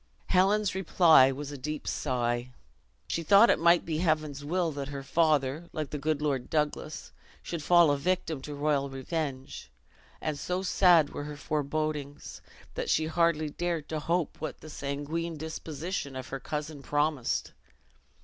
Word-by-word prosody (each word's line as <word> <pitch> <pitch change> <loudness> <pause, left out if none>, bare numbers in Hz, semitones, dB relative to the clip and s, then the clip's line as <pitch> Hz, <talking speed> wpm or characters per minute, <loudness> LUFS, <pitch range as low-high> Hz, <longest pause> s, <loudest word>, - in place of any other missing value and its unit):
Helen's 195 +2 +3
reply 170 -7 +5
was 145 +2 -6
a 145 - -7
deep 150 +3 -5
sigh: 120 -2 -1 0.6
she 170 - -2
though 200 +5 +6
it 235 - +5
might 170 +1 +4
be 155 -2 -2
Heaven's 155 -4 0
will 170 +2 0
that 140 -2 -5
her 140 -1 -6
father, 155 +1 +1
like 155 -3 -4
the 150 - -3
good 150 +1 -1
Lord 135 -4 -1
Douglas, 150 0 -2 0.3
should 170 -2 -4
fall 170 0 +5
a 145 - +1
victim 165 -3 -1
to 145 +2 -7
royal 145 -1 0
revenge; 135 - -5 0.5
and 150 -2 -3
so 180 +5 -2
sad 175 -5 +4
were 145 - -5
her 150 0 -7
forebodings, 150 -1 -3 0.3
that - - -3
she 160 - +2
hardly 160 -2 +1
dared 170 -2 -2
to 155 - -2
hope 170 0 -1
what 155 - -5
the 155 - -10
sanguine 150 +4 -4
disposition 160 -1 -5
of 130 -1 -6
her 135 - -4
cousin 150 +1 -5
promised. 145 -2 0
155 Hz, 160 wpm, -29 LUFS, 140-165 Hz, 0.6 s, though